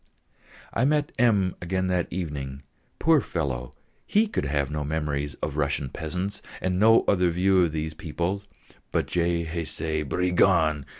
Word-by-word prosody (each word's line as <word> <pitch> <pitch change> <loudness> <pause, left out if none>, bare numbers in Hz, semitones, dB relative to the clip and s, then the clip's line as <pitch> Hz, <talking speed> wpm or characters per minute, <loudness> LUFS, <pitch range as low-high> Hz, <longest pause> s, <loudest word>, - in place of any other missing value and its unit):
I 115 - +1
met 150 +1 +2
M. 105 -7 +3
again 95 +1 -1
that 90 -2 +1
evening. 75 -6 -5 0.3
Poor 160 -3 +4
fellow! 65 -7 -3 0.4
he 215 +2 +4
could 210 - -2
have 70 -1 0
no 75 -1 -2
memories 75 -1 -2
of 75 -1 -2
Russian 70 -2 0
peasants, 90 +8 -4 0.2
and 90 0 -1
no 115 +2 +6
other 90 -3 +3
view 90 +1 +3
of 80 - -2
these 80 0 -3
people 85 +5 -3 0.5
but: - - +1
"_Je 85 -1 0
haïs 80 -1 -3
ces 80 +1 -2
brigands! 85 -3 +2
85 Hz, 155 wpm, -26 LUFS, 75-95 Hz, 0.5 s, no